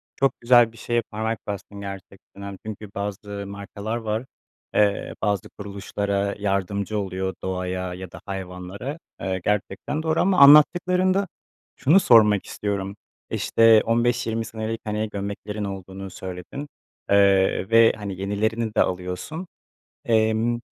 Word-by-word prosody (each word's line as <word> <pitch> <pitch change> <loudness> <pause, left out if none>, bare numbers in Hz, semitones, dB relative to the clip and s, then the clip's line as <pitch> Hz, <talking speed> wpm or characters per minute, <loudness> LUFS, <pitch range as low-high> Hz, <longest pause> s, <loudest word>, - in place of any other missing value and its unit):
Çok 135 0 0
güzel 120 -1 +6
bir 115 - -17
şeye 120 +1 0
parmak 110 +1 -2
bastın 100 0 -6
gerçekten. 100 0 -10
Hani, 100 -1 -7
çünkü 105 -1 -7
bazı 100 0 -4
markalar 100 +2 -5
var. 110 +1 -3 0.5
Eee, 100 -1 +2
bazı 100 -3 0
kuruluşlara 100 0 -3
yardımcı 100 +1 -1
oluyor, 95 -1 -3
doğaya 90 -1 -3
ya 90 -1 -8
da - - -11
hayvanlara, 95 - -6 0.2
eee, 95 -1 -2
gerçekten 105 +9 -1
doğru. 160 0 +1
Ama 185 0 +2
anlattıklarında 180 +6 +6 0.5
şunu 155 +9 +5
sormak 105 - +5
istiyorum. 100 -1 -3 0.3
İşte, 115 -1 +5
15-20 115 -1 +1
senelik, 110 0 -4
hani, 105 0 -2
gömleklerin 100 +1 -5
olduğunu 95 0 -6
söyledin, 95 +10 -7 0.4
eee, 100 -1 +4
ve, 115 0 +6
hani, 100 -2 -5
yenilerini 110 +3 -1
de - - +4
alıyorsun. 90 - -3 0.6
Emm, 115 0 +2
105 Hz, 125 wpm, -24 LUFS, 100-115 Hz, 0.6 s, güzel